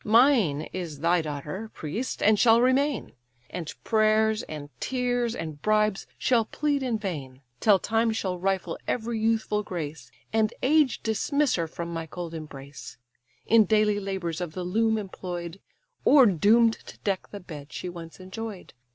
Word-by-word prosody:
Mine 225 - +4
is 165 -6 -5
thy 170 +1 +3
daughter, 155 +8 -5
priest, 200 - -4
and 210 0 +5
shall 230 0 +6
remain; 265 +4 +2 0.4
And 170 -4 -5
prayers, 220 0 +3
and 150 -8 -8
tears, 245 -2 0
and 155 -3 -6
bribes, 215 -2 +1
shall 240 -3 +3
plead 290 +3 -1
in 250 -4 0
vain; 140 -10 -6 0.2
Till 210 -3 +5
time 225 +4 +1
shall 190 -5 -2
rifle 190 0 -1
every 230 -1 -1
youthful 220 -1 +1
grace, 160 -6 -6 0.2
And 220 -1 +2
age 295 -1 +3
dismiss 280 +6 +1
her 170 -2 0
from 170 +1 -6
my 165 -1 -4
cold 170 +1 -6
embrace, 140 -6 -9 0.5
In 225 -1 +6
daily 210 0 +3
labours 190 -4 -3
of 170 -3 -4
the 185 - -4
loom 220 +5 +1
employ'd, 180 -3 -6 0.4
Or 280 -3 +7
doom'd 220 +5 +5
to - - -10
deck 195 -2 -1
the 205 - -7
bed 150 -6 -10
she - - -5
once 170 -1 -9
enjoy'd. 195 +1 -7
205 Hz, 155 wpm, -27 LUFS, 170-225 Hz, 0.5 s, Or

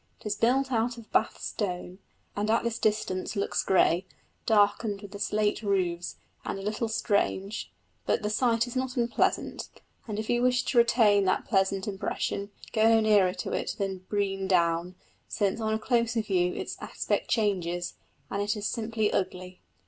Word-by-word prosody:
It - - -21
is 210 0 -1
built 260 +5 +2
of 235 -1 -1
Bath 220 - +1
stone, 180 -2 -4 0.4
and 205 +1 -1
at 225 - +3
this 235 0 -2
distance 210 -2 0
looks 200 - 0
grey, 185 -1 +3 0.4
darkened 205 -1 +2
with 200 - -9
the 205 - -8
slate 210 +1 0
roofs, 180 -4 -1 0.3
and - - -3
a 195 - -7
little 215 +3 -1
strange; 205 -1 -1 0.4
but - - +1
the 210 - 0
sight 230 0 +2
is 245 +1 -8
not 255 0 -2
unpleasant, 235 -1 0 0.4
and 210 -2 -4
if 215 0 -3
you 240 0 +1
wish 250 0 +3
to 245 - +2
retain 215 -4 +4
that 185 - +1
pleasant 195 -1 +1
impression, 200 0 -2 0.2
go 225 +1 +5
not 225 - +3
nearer 205 -4 +4
to - - -4
it - - -2
than 195 -2 -2
Brean 195 -2 -1
Down, 170 -1 +1 0.3
since 205 +2 -1
on 220 0 0
a - - +1
closer 235 0 +1
view 180 -3 +1
its - - -5
aspect - - -2
changes, 175 -6 0 0.4
and 200 - -1
it 210 +1 0
is 205 - -4
simply 220 -1 -1
ugly. 185 -1 -3
210 Hz, 170 wpm, -28 LUFS, 190-225 Hz, 0.4 s, go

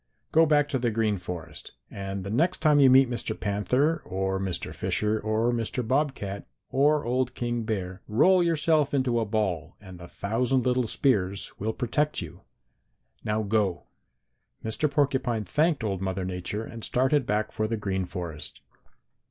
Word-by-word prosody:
Go 160 0 +5
back 145 -1 +3
to 130 - 0
the 120 -1 +1
Green 110 -3 0
Forest, 90 -3 -8 0.2
and 95 -1 -5
the 100 - -5
next 165 +11 +2
time 150 -2 +4
you 135 -2 +7
meet 130 +1 +7
Mr. 120 -2 -3
Panther 125 +11 +1
or 95 0 -2
Mr. 95 -3 -3
Fisher 105 +1 0
or 110 +3 +1
Mr. 120 0 -2
Bobcat 130 -7 -1 0.2
or 145 +2 +3
old 125 +1 0
King 120 -1 -2
Bear 95 -3 -3
roll 180 - +4
yourself 155 -3 +2
into 125 -3 +1
a 115 - 0
ball 100 -7 -2
and 95 -3 -12
the 85 - -10
thousand 120 +8 0
little 125 -1 +2
spears 100 -7 0
will 110 +3 -1
protect 145 +7 -1
you. 85 +1 -8 0.8
Now 105 +1 0
go!' 100 -4 0 0.8
"Mr. 110 +7 0
Porcupine 130 -6 +1
thanked 150 - +1
old 100 -3 -2
Mother 95 -1 -2
Nature 90 +4 -4
and 115 -1 -9
started 130 +1 +1
back 105 +1 0
for 110 - -1
the 115 0 -2
Green 95 -2 -2
Forest. 85 -4 -6
110 Hz, 160 wpm, -27 LUFS, 100-135 Hz, 0.8 s, you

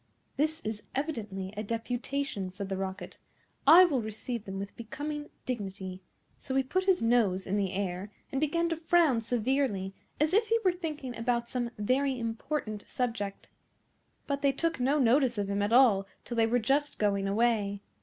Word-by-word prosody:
"This 315 +2 0
is 215 -1 -4
evidently 210 -10 -3
a 210 - -3
deputation," 230 -1 -3
said 195 +1 -6
the 195 - -1
Rocket; 190 0 -5 0.5
"I 345 +5 +10
will 280 -8 +1
receive 220 +1 -4
them 195 0 -5
with 200 +1 -6
becoming 295 +6 -5 0.2
dignity": 195 -5 -4 0.4
so 265 - -4
he 270 - +3
put 370 +8 -1
his 380 -9 +3
nose 220 -6 +2
in 195 - -1
the 195 -3 0
air, 190 +1 -3 0.2
and 270 - -1
began 335 +3 +1
to 330 - 0
frown 325 -7 +3
severely 230 -4 0 0.3
as 305 +3 +2
if 440 +3 +4
he 455 +1 +3
were 370 - +6
thinking 305 -8 -5
about 235 0 -1
some 245 -2 -2
very 260 +5 +1
important 225 -1 -3
subject. 230 -5 -3 0.7
But 280 -1 -2
they 280 - +4
took 330 +2 -1
no 270 +4 +2
notice 255 -2 +3
of 200 -1 -1
him 200 0 0
at 205 +2 0
all 230 -6 +5 0.2
till 240 - -5
they 225 -1 +3
were 240 +2 +2
just 275 +5 +1
going 200 -2 +1
away. 205 -2 +1
235 Hz, 175 wpm, -30 LUFS, 205-280 Hz, 0.7 s, I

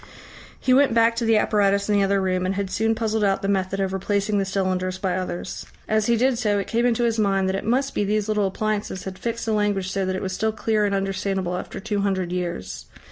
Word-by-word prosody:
He 255 - +2
went 270 -3 +4
back 230 0 +4
to 235 - 0
the 225 -1 +4
apparatus 200 -2 +2
in 210 - +1
the 200 - +3
other 195 0 +2
room, 185 -1 0
and 185 +1 -1
had 195 -1 -3
soon 225 +3 +1
puzzled 220 -1 -1
out 195 -1 +1
the - - 0
method 195 -1 0
of 190 -1 -1
replacing 200 +2 0
the 195 - 0
cylinders 185 -1 -1
by 190 -2 -1
others. 185 -1 -5 0.2
As 215 -1 +1
he 235 -1 +3
did 250 0 +2
so, 210 -3 +1
it 200 - -1
came 235 +2 +1
into 240 0 +1
his 230 -1 +1
mind 195 -2 +2
that 190 - 0
it 195 - -3
must 265 +5 +1
be - - 0
these 210 +1 0
little 210 -2 +1
appliances 205 -1 -2
had 190 -1 -7
fixed 230 0 -3
the 225 - 0
language 205 -3 0
so 195 0 -1
that 185 - -1
it 185 - -3
was 190 -1 -3
still 220 +3 0
clear 215 -1 +1
and 200 -1 0
understandable 195 -2 -1
after 180 - -6
two 205 +1 -2
hundred 190 -3 -1
years. 175 - -4
200 Hz, 250 wpm, -23 LUFS, 190-220 Hz, 0.2 s, went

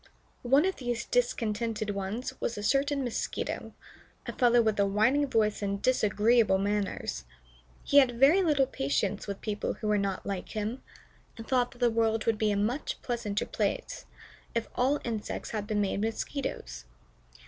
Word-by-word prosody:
One 270 +6 +4
of 380 - -1
these 240 -2 -3
discontented 225 -3 -1
ones 200 +5 -4
was 235 - -2
a 205 - -5
certain 275 +4 +1
Mosquito, 240 -3 -3 0.5
a - - -5
fellow 245 -1 +4
with 220 -3 +2
a 200 - +4
whining 235 +9 +2
voice 215 -5 +1
and 200 0 -1
disagreeable 220 -2 +3
manners. 200 - -2 0.6
He 285 - +6
had 245 -4 +2
very 300 +9 +6
little 295 -6 +3
patience 195 - -1
with 200 -1 -5
people 210 -1 -2
who 215 - -5
were 210 -1 +2
not 195 -1 -2
like 195 -2 -4
him, 220 +3 -3 0.6
and 225 - -9
thought 250 -2 +2
that 245 - -17
the 240 -1 +2
world 225 -1 +1
would 225 -2 +1
be 215 - +2
a 205 - +1
much 235 +8 -1
pleasanter 220 -4 -2
place - - -3 0.5
if 230 -1 -1
all 260 +3 +2
the - - -13
insects 225 -3 -4
had 210 -2 -3
been 210 -1 0
made 200 0 -1
Mosquitoes. 215 - -4
225 Hz, 170 wpm, -29 LUFS, 205-245 Hz, 0.6 s, He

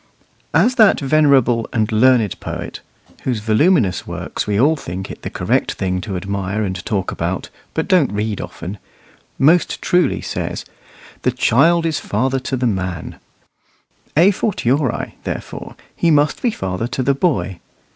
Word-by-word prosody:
As 255 - +4
that 215 - +6
venerable 135 -5 +3
and 110 -2 0
learned 115 -2 +3
poet - - -6 0.4
(whose 125 -4 -1
voluminous 110 - +2
works - - -4
we 105 -1 +1
all 150 +6 +4
think 95 - -6
it - - -10
the - - -5
correct - - 0
thing 90 -1 -2
to 100 -2 -4
admire 100 +2 -2
and 95 -2 -3
talk 100 -4 -1
about, - - -3 0.3
but 160 - -1
don't 180 - +3
read 105 0 -2
often) 95 +4 -7 0.6
most 165 +6 +3
truly 180 0 +2
says, - - -4 0.6
"The - - +2
child 165 +8 +3
is 160 -2 0
father 130 +6 0
to 130 +1 -3
the 125 - -1
man;" 95 -6 -3 1.0
a 180 +5 +7
fortiori, 145 - -1
therefore, - - -6 0.2
he 170 - +2
must 150 -1 +3
be 245 - +2
father 95 - -3
to 130 - -2
the 140 - +3
boy. 95 - 0
120 Hz, 150 wpm, -19 LUFS, 100-150 Hz, 1.0 s, a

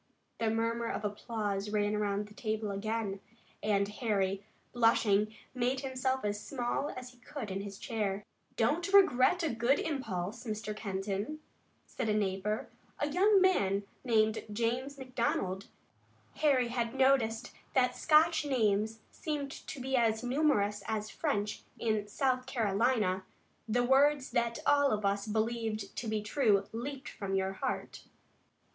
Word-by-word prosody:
The 225 -1 +1
murmur 230 +1 0
of 215 - -3
applause 205 -1 -2
ran 210 0 +1
around 205 -1 0
the 210 - -14
table 215 -1 -2
again, 205 0 -2 0.4
and 200 -1 +2
Harry, 200 -3 -1 0.3
blushing, 215 -3 +3 0.2
made 255 +1 0
himself 260 -2 -1
as 205 0 -1
small 245 +4 -2
as 255 0 -7
he 250 - -22
could 250 -5 -6
in 195 +1 -2
his 200 -1 -7
chair. 205 -4 -2 0.3
"Don't 305 - +1
regret 360 -3 +5
a 320 - +1
good 235 +4 +3
impulse. 220 - -3
Mr. 215 -2 -4
Kenton," 200 +7 -3 0.5
said 245 -4 -3
a 210 - +2
neighbor, 205 +1 -1 0.3
a 290 - -1
young 390 +6 +5
man 200 - +3 0.2
named 220 -3 +2
James 245 +6 -1
McDonald 235 -7 -1 0.7
Harry 265 -5 +3
had 235 0 -2
noticed 255 -4 +2 0.2
that 250 -1 +3
Scotch 315 +1 +4
names 220 -5 +1
seemed 290 -3 -3
to 280 - -8
be 265 +1 -1
as 225 -2 +2
numerous 245 -7 +2
as 215 -1 -2
French 210 -9 -1 0.2
in 215 -2 0
South 255 +3 0
Carolina 215 -4 +1 0.5
"the 245 +3 +2
words 275 +2 +4
that 235 -1 +1
all 285 -1 +5
of 210 -3 0
us 200 +1 0
believe 220 -1 -1
to 235 - -4
be 215 -1 -1
true 210 -4 +2
leaped 265 +4 -5
from 195 -1 -3
your 190 0 0
heart." 190 - -4
225 Hz, 140 wpm, -32 LUFS, 205-260 Hz, 0.7 s, regret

